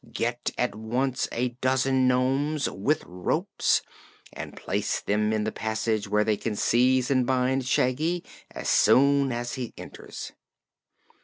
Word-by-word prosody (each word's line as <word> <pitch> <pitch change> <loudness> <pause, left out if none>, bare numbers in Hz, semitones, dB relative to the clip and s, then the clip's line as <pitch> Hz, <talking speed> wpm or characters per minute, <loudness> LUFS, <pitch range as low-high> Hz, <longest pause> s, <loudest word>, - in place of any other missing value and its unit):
"Get 120 +1 -2
at 125 - 0
once 120 +4 -1
a 125 +2 0
dozen 130 0 +2
nomes, 135 +4 +1
with 140 +11 -1
ropes, 90 0 0 0.5
and - - -8
place - - -1
them 105 +1 0
in 110 -1 0
the - - -1
passage 110 -1 -2
where 105 +1 +2
they 105 -1 +1
can 110 0 -3
seize 125 +4 +2
and 130 -2 +3
bind 130 +1 0
Shaggy 155 +8 +1 0.3
as - - -7
soon 140 0 +4
as 120 0 -3
he 125 -4 -5
enters." - - -9
125 Hz, 140 wpm, -26 LUFS, 110-130 Hz, 0.5 s, soon